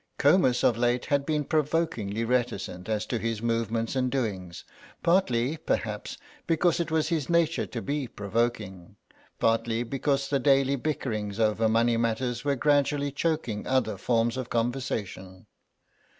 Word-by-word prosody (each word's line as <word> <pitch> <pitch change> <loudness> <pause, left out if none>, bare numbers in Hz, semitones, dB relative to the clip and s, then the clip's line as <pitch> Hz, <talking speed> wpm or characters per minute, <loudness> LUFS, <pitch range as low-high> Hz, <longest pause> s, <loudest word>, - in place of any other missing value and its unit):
Comus 140 -5 +4
of 115 -1 +3
late 120 0 +1
had 140 -1 0
been 150 -2 +1
provokingly 145 -9 -1
reticent 115 -6 -2
as 110 -1 -1
to 120 - -2
his 115 -1 -2
movements 115 0 -1
and 130 -1 +1
doings; 100 -10 -3 0.4
partly, 160 -6 +2
perhaps, 160 - -3 0.3
because 170 +1 +2
it 170 -1 -1
was 160 -1 +1
his 160 -6 -1
nature 170 -1 +2
to - - -6
be 140 -2 -2
provoking, 105 -4 -3 0.4
partly 115 +1 +1
because 135 +2 -1
the 140 -1 +1
daily 135 0 +3
bickerings 115 -8 -3
over 110 0 +2
money 115 +1 +3
matters 120 +1 -1
were 140 -1 +1
gradually 145 +1 +2
choking 145 -8 -2
other 130 -5 +1
forms 115 +3 0
of 130 -1 -4
conversation. 115 -6 -3
120 Hz, 140 wpm, -27 LUFS, 115-145 Hz, 0.4 s, Comus